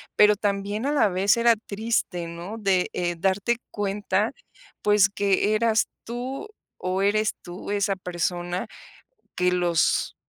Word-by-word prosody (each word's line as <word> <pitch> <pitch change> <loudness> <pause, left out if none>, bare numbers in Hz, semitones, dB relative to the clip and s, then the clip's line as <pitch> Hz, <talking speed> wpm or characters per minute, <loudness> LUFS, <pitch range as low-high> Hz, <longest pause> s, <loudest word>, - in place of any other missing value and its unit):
Pero, 210 0 +6
también 205 +2 -2
a - - +1
la 285 -7 +4
vez 195 +4 +2
era 235 0 +5
triste, 210 -4 -2
¿no?, 170 +6 -7
de, 195 -4 +1
eh, 175 -1 -1
darte 195 +6 +1
cuenta, 205 -1 0 0.5
pues, 205 -1 +5
que 200 +1 +1
eras 225 0 +2 0.2
tú 255 - -5 0.3
o 185 +1 -2
eres 215 +1 +2
tú 175 +2 -8
esa 200 -1 +1
persona 175 +2 -3 0.7
que 180 0 +2
los 175 -2 +1
200 Hz, 135 wpm, -25 LUFS, 180-215 Hz, 0.7 s, Pero